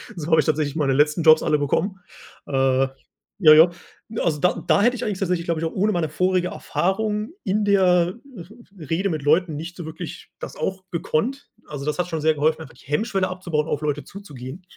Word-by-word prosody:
So 160 -4 -6
habe 160 - +6
ich 150 - +2
tatsächlich 155 -1 0
meine 140 -4 +1
letzten 150 +4 +2
Jobs 155 0 +6
alle 150 - +2
bekommen 185 +7 -1 0.5
äh 135 -1 +2 0.6
ja, 155 -1 +10
ja. 165 +3 +7 0.5
Also 160 -3 +1
da 180 - +1
da 200 - +4
hätte 245 +2 +3
ich 240 - -5
eigentlich 205 -3 -2
tatsächlich, 180 -3 -1
glaube 170 -2 -1
ich, 165 - -2
auch 160 - -3
ohne 205 +3 +1
meine 170 -5 -1
vorige 185 +3 +1
Erfahrung 210 - -2
in 205 +2 0
der 200 -1 +3
R 180 -1 +3 0.2
R 170 0 -10 0.4
Rede 190 +5 +1
mit 155 -5 -3
Leuten 160 +2 +2
nicht 165 +4 -7
so 175 - -7
wirklich 160 +2 -8
das - - -8
auch 190 +4 -3
gekonnt. 225 - -2 0.2
Also, 145 -2 -7
das 150 - -1
hat 180 0 -1
schon 160 -3 -3
sehr 155 0 +3
geholfen, 155 +2 +1
einfach 135 -6 -11
die - - -20
Hemmschwelle 190 - 0
abzubauen, 175 -4 -2
auf 150 - -2
Leute 150 -1 -2
zuzugehen. 150 -4 -10
165 Hz, 210 wpm, -22 LUFS, 150-185 Hz, 0.6 s, ja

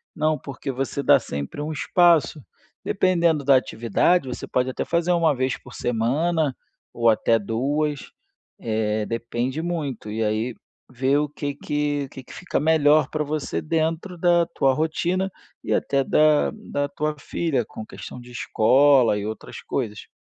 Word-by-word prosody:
Não, 155 0 +1
porque 135 +1 -6
você 135 +2 -3
dá 140 -2 +6
sempre 70 - -5
um 155 +2 -3
espaço. 165 -1 +3 0.4
Dependendo 170 -5 +2
da 140 -1 +6
atividade, 130 - +1
você 125 - -5
pode 125 +1 0
até - - -3
fazer 170 +1 0
1 165 -3 +3
vez 130 -1 -1
por 125 - -15
semana, 140 +6 0 0.4
ou 115 -1 +3
até 115 +1 +3
2, 140 +7 -2 0.5
eh, 110 -1 -1
depende 120 +5 -3
muito, 150 -11 -4
e 110 +1 -3
aí, 110 +3 -1 0.4
ver 130 +3 +1
o 150 0 0
que 145 -1 -4
que 145 0 -1
o - - -14
que 135 - -10
que - - -14
fica 180 - -2
melhor 155 -1 +4
para 155 -1 -1
você 150 0 -3
dentro 165 +3 -2
da 175 0 +3
tua 135 -5 +1
rotina, 175 +5 -1 0.3
e - - -1
até 140 -1 +1
da 150 +2 +3
da 145 -10 -3
tua 150 +2 -2
filha, 140 -5 -1
com 110 - -9
questão 125 - -9
de 125 0 -13
escola 125 0 +4
e 105 - -4
outras 110 0 -7
coisas. 110 -7 -4
145 Hz, 160 wpm, -23 LUFS, 125-160 Hz, 0.5 s, dá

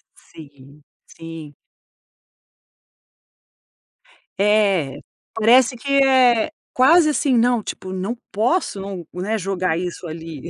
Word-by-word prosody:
Sim, 145 -1 -17 0.2
sim. 165 -3 -11 2.8
É, 200 -8 +1 0.3
parece 245 +3 +4
que 275 +4 -6
é 255 -2 +3 0.2
quase, 305 +5 +5
assim: 285 -3 +1
"Não, 240 -1 +2
tipo, 185 - -7
não 190 +5 -4 0.2
posso, 225 - -1
não 195 -3 -7
né, 195 +5 -2
jogar 185 -4 -2
isso 180 0 -6
ali". 160 -3 -8
200 Hz, 95 wpm, -20 LUFS, 165-245 Hz, 2.8 s, quase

